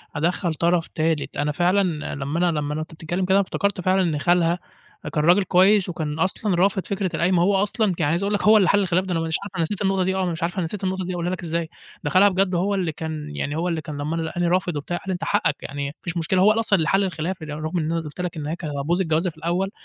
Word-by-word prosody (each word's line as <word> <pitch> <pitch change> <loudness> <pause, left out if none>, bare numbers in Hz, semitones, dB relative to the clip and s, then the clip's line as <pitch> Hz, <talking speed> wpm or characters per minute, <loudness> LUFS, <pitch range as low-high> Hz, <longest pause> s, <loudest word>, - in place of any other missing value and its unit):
أدخَّل 170 +2 0
طرف 170 +1 +1
تالت، 160 -1 -1
أنا 145 +1 0
فعلًا 175 -1 0
لمّا 140 +3 -3
أنا 155 -2 0
لمّا 145 0 -2
أنا 155 - -3
أنت 155 - -7
وبتتكلم 175 +4 -3
كده 190 +2 +4
افتكرت 200 -1 -1
فعلًا 185 +2 +2
إن 160 -5 0
خالها 175 +1 +2 0.5
كان 150 - +1
راجل 180 +4 +5
كويس 190 +2 +4
وكان 155 -2 -4
أصلًا 190 +1 0
رافض 190 +1 +1
فكرة 190 -3 -2
القايمة، 175 +1 +2
هو 195 +2 +3
أصلًا 215 +2 0
يعني 145 -2 +2
عايز 170 +4 0
أقول 205 +1 0
لك 205 - 0
هو 215 +1 +7
اللي 190 -4 +4
حلّ 205 - +4
الخلاف 185 0 +1
ده 185 - -4
أنا 165 - 0
مش 160 0 -1
عارف 200 -2 -9
أنا 170 - 0
نسيت 200 +5 -3
النقطة 195 -1 +1
دي 190 +1 0
آه، 190 - 0
أنا 175 - 0
مش 165 +1 -4
عارف 175 +3 -1
أنا 185 - -1
نسيت 195 +4 -5
النقطة 185 -1 -1
دي 185 - -3
أقولها 175 0 -2
لك 185 - -4
إزاي، 165 0 -2 0.3
ده 145 - -1
خالها 200 +4 +6
بجد 185 -1 +1
هو 200 +4 +1
اللي 180 -4 -1
كان 155 -1 -6
يعني 145 +1 -2
هو 170 +3 -1
اللي 165 -2 -1
كان 150 -2 -7
لمّا 150 +3 -2
أنا 165 - -1
لقاني 175 +2 -1
رافض 180 -1 +1
وبتاع، 160 +4 -3
قال - - -10
لي 190 - 0
أنت 175 - -5
حقَّك 145 - +1
يعني 140 0 -4
ما 140 - -7
فيش 170 0 -4
مشكلة 185 +3 +1
هو 210 - +6
اللي 225 - +1
أصلًا 210 -3 +3
اللي 160 -2 0
حلّ 195 +2 +3
الخلاف، 175 0 -3
ر 155 - -7
رغم 155 +4 -3
إن 155 +1 -1
أنا 165 - 0
قلت 155 +3 -7
لك 175 -3 -4
إن 150 -1 -4
هي 160 - -2
كانت 155 -4 -6
هتبوظ 170 +6 +1
الجوازة 165 +1 +1
في 160 - -14
الأول، 175 +5 -1
175 Hz, 285 wpm, -23 LUFS, 160-190 Hz, 0.5 s, هو